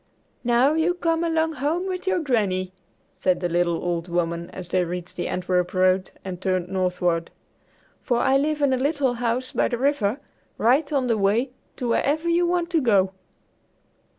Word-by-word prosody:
"Now, 245 +4 +3
you 325 +3 +1
come 330 -1 0
along 320 -1 +1
home 325 +6 0
with 370 0 -4
your 380 - +2
Granny," 200 - 0 0.4
said 185 -1 0
the 175 - -1
little 175 -1 0
old 170 -1 -2
woman 170 0 -2
as 180 -2 -9
they 185 0 +2
reached 175 0 -6
the - - -3
Antwerp 180 0 -1
road 185 0 +3 0.2
and 185 -1 -6
turned 185 -2 -1
northward, 180 -3 0 0.7
"for 245 - 0
I 265 +2 +3
live 295 +2 +1
in 275 -2 +3
a - - +2
little 280 -1 +1
house 245 +2 -2
by - - +1
the 240 - -2
river 265 -3 +1 0.4
right 270 +7 +2
on 275 -3 +1
the 230 -3 +1
way 220 +7 +1 0.2
to 245 - -3
wherever 300 +7 +1
you 345 +1 +3
want 350 0 0
to 330 -2 +2
go!" 195 -6 +3
235 Hz, 180 wpm, -24 LUFS, 185-295 Hz, 0.7 s, Now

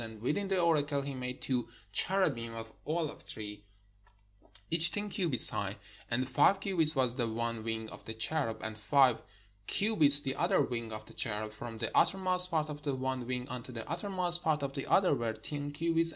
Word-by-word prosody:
And 110 -1 -8
within 150 - -1
the 190 -1 0
oracle 145 -4 +1
he 140 0 -5
made 125 -1 -6
two 125 -3 -1 0.2
cherubim 120 - 0
of 115 0 -8 0.2
olive 155 -1 -2
tree, 105 -1 -8 1.1
each 165 +1 +4
ten 205 0 -2
cubits 165 - +5
high. 100 0 -3 0.3
And 130 +2 0
five 150 +8 +4
cubits 170 -6 +2
was 130 -3 +3
the 120 -2 0
one 115 0 -2
wing 110 0 -3
of - - -12
the 110 - -6
cherub, 115 -2 -1
and 110 0 -4
five 125 +2 +3 0.5
cubits 160 -10 +6
the 135 -1 -3
other - - +2
wing 115 -2 -4
of 110 0 -7
the - - -12
cherub: 110 -1 -2
from 115 +1 -8
the 115 0 -4
uttermost 185 -1 +4
part 160 -3 0
of 150 -1 -7
the 140 -2 -2
one 130 -1 -3
wing 125 0 -3
unto 125 0 -7
the 115 -2 -7
uttermost 175 +1 0
part 155 -3 0
of 135 -1 -3
the 135 -1 -5
other 190 -5 +4
were 115 -4 -1
ten 145 +6 -5
cubits. 165 +2 +1
135 Hz, 195 wpm, -32 LUFS, 115-165 Hz, 1.1 s, cubits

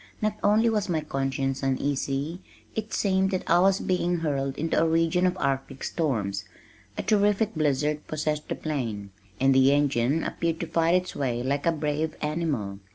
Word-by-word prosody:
Not 215 0 0
only 215 +3 +4
was 210 -3 0
my 160 -3 +1
conscience 135 -1 -2
uneasy, 140 +4 -1 0.3
it 220 0 -4
seemed 190 -1 +2
that 185 -2 -3
I 170 - +5
was 195 +1 +4
being 180 -1 0
hurled 140 -3 -1
into 160 +1 +1
a 165 - +3
region 165 +2 +2
of 180 +1 -1
arctic 135 -1 -2
storms. 105 - -1 0.5
A - - -2
terrific 210 0 +2
blizzard 150 -1 0
possessed 150 0 -2
the - - -1
plain, 115 -10 -4 0.3
and 135 +1 +4
the 130 +1 +5
engine 140 0 +2
appeared 165 -1 -2
to - - -1
fight 165 +1 +2
its 180 0 -1
way 120 -3 -1
like 140 +4 -1
a - - +5
brave 155 0 -2
animal. 150 -11 -2
150 Hz, 170 wpm, -26 LUFS, 135-175 Hz, 0.5 s, I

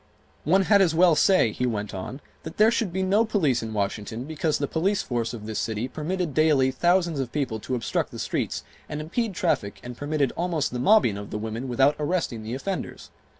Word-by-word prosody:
"One 190 +6 +4
had 200 +1 +5
as 170 -4 +3
well 175 0 +6
say," 170 - +4
he 125 +4 -1
went 105 -3 -3
on, 110 +9 -6 0.2
"that 160 - -9
there 215 +2 +6
should 225 -5 0
be 190 +2 -1
no 200 +4 +3
police 175 - +1
in 115 -1 -5
Washington 105 +2 -3
because 155 +1 -1
the 145 - -1
police 190 +7 0
force 120 -2 -2
of 115 -3 -8
this 110 0 -3
city 110 +2 -2
permitted 165 +3 -3
daily 145 -4 +3
thousands 175 +2 +2
of 130 -3 -3
people 130 -7 -2
to 130 +4 -3
obstruct 120 - -1
the - - -9
streets - - -2 0.3
and 150 - -4
impede 195 +7 -2
traffic 100 -10 -1
and 125 0 -7
permitted 145 -1 0
almost 170 -6 -1
the 125 - -2
mobbing 160 - +4
of 100 - -8
the - - -4
women 110 +4 -4
without 135 +4 +3
arresting 150 -7 -1
the 110 +3 -5
offenders. 190 +8 -5
145 Hz, 210 wpm, -25 LUFS, 120-180 Hz, 0.3 s, well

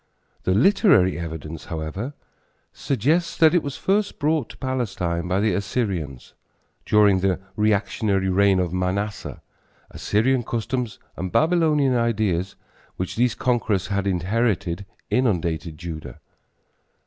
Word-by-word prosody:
The 95 - +2
literary 120 - +4
evidence, 80 -1 -6
however, 85 - -5 0.6
suggests 150 - 0
that 160 0 +6
it 175 - +4
was 140 -3 -5
first 200 +1 0
brought 150 -3 0
to - - -12
Palestine 95 -10 -2
by 95 +1 +1
the 105 -1 +2
Assyrians. 90 - -3 0.5
During 105 -3 +5
the 95 -1 +1 0.2
reactionary 105 -2 +1
reign 95 0 +3
of 90 -2 -1
Manasseh, 95 +3 -3 0.5
Assyrian 120 +5 +1
customs 120 0 -3 0.2
and 95 +1 -4
Baylonian 155 -5 +3
ideas, 105 -6 0 0.4
which 95 - -3
these 120 0 +2
conquerors 115 -7 0
had 100 -1 -1
inherited, 100 0 0 0.2
inundated 85 -9 0
Judah. 80 -2 -7
100 Hz, 115 wpm, -23 LUFS, 90-125 Hz, 0.6 s, that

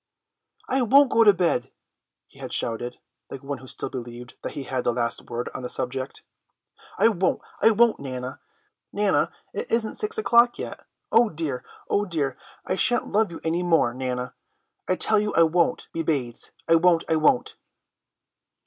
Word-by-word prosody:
"I 265 +1 +2
won't 270 +3 +5
go 230 - +5
to 210 - +8
bed," 175 -10 0 0.5
he - - -20
had - - -7
shouted, 120 +2 -1 0.3
like 135 - -8
one 140 -1 -4
who 130 - -13
still - - -3
believed 120 -1 -8
that - - -5
he 140 - -5
had 130 -1 -3
the 120 - +2
last 120 -1 -2
word 120 0 -3
on - - -6
the 125 - -5
subject, 130 +1 -4 0.7
"I - - +5
won't, 185 -4 0 0.2
I - - +7
won't. 225 +1 +3
Nana, 130 -1 -6 1.1
it - - -4
isn't 225 -1 0
six 440 +1 -3
o'clock 240 - +4
yet. - - -7 0.2
Oh 230 0 +5
dear, 150 -7 -4 0.2
oh 205 - +1
dear, 150 -8 -2 0.3
I - - -1
shan't 245 +4 +1
love 215 -2 +2
you 165 - -8
any 165 +2 0
more, 165 -9 +2
Nana. 125 -1 -4 0.5
I 185 - +2
tell 215 +3 +2
you 210 0 -2
I 165 - +6
won't 170 +1 +1
be 165 - -2
bathed, 135 -7 -2 0.2
I 165 - +6
won't, 170 0 +3
I 160 - +2
won't!" 155 -5 +2
160 Hz, 175 wpm, -24 LUFS, 125-210 Hz, 1.1 s, to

